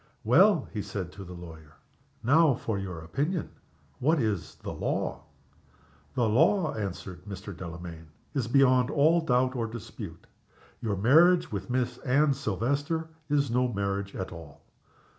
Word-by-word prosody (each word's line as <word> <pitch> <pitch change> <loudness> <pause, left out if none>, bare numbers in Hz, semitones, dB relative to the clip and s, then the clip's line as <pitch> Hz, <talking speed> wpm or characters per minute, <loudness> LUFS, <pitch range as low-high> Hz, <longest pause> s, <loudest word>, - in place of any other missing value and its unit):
"Well," 170 - +5
he 105 - -2
said 95 -3 -5
to 100 - -9
the 90 -1 -9
lawyer, 80 -4 -11 0.5
"now 150 +2 +5
for 110 -3 -3
your 90 -4 -5
opinion! 145 - -2 0.5
What 155 +5 +3
is 105 -7 -1
the - - -7
law?" - - -2 0.9
"The 120 -2 +2
law," 160 - +3
answered 95 -4 -5
Mr. 100 -1 -7
Delamayn, 85 -1 -8 0.3
"is 130 -5 -1
beyond 130 0 +4
all 155 +4 +4
doubt 130 -3 +2
or 115 -2 -1
dispute. 115 -3 -8 0.6
Your 110 -4 -1
marriage 160 - +5
with 95 -2 -4
Miss 125 -1 -1
Anne 140 +3 +3
Silvester 140 - -1 0.2
is 140 -3 +2
no 125 +1 +2
marriage 100 -1 -2
at 95 - -4
all." 80 -4 -11
115 Hz, 140 wpm, -28 LUFS, 95-140 Hz, 0.9 s, Well